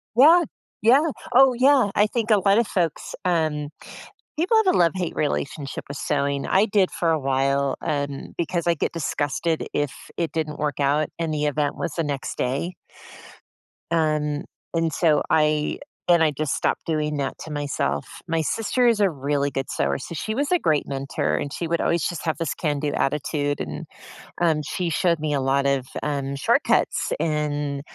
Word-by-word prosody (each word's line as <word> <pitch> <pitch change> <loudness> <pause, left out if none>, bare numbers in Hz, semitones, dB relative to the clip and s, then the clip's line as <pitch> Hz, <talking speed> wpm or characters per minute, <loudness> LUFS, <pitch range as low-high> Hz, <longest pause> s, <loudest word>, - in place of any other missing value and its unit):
Yeah. 320 +8 +7 0.4
Yeah. 275 +8 +5 0.2
Oh, 265 +1 +7
yeah, 255 -2 +4
I 210 - +4
think 225 0 -1
a 210 - +6
lot 195 +1 +3
of 235 - +3
folks, 170 -4 -2
um, 155 -4 0 0.7
people 375 +7 +3
have 370 - +4
a - - +2
love-hate 175 0 +1
relationship 145 -1 -2
with 140 - -6
sewing. 140 -1 -1
I 195 +3 +4
did 200 -3 +2
for 165 -1 0
a 160 - +2
while, 135 0 +1
um, 140 -1 -3
because 170 0 -1
I 170 - +4
get 160 - -2
disgusted 160 0 -1
if 145 -2 -1 0.2
it 165 -2 -1
didn't 155 -2 -3
work 145 -2 -2
out, 145 +2 +2
and 165 -1 -1
the 150 -1 -1
event 145 0 0
was 170 - -3
the 165 - -1
next 140 -3 -4
day. 140 +8 -1 1.2
Um, 150 -2 +1 0.3
and 165 -1 +1
so 155 -1 +3
I 150 -1 +2 0.3
and 170 -1 +5
I 155 - +3
just 150 0 -2
stopped - - -1
doing 150 -2 0
that 140 -1 -2
to 160 - -8
myself. 140 - -2 0.2
My 165 0 +1
sister 225 - +1
is 230 -3 +3
a 200 -3 +3
really 140 0 -1
good 135 -1 -3
sewer, 70 0 0
so 170 - -7
she 215 +8 -3
was 280 +7 -1
a 360 - +5
great 155 - +1
mentor, 135 0 -1
and 145 0 -4
she 170 - -3
would 170 +1 0
always 170 -1 +1
just 175 -1 -5
have 160 - 0
this 165 - -2
can-do 150 -2 -1
attitude, 145 0 -1
and, 75 -1 -5 0.5
um, 160 -3 +2
she 170 +3 -3
showed 170 0 +2
me 150 -1 -1
a 140 - +1
lot 135 +1 +1
of, 135 -2 +1 0.2
um, 140 -2 -2
shortcuts, 140 - +1
and, 150 -2 -1
155 Hz, 180 wpm, -24 LUFS, 145-175 Hz, 1.2 s, Yeah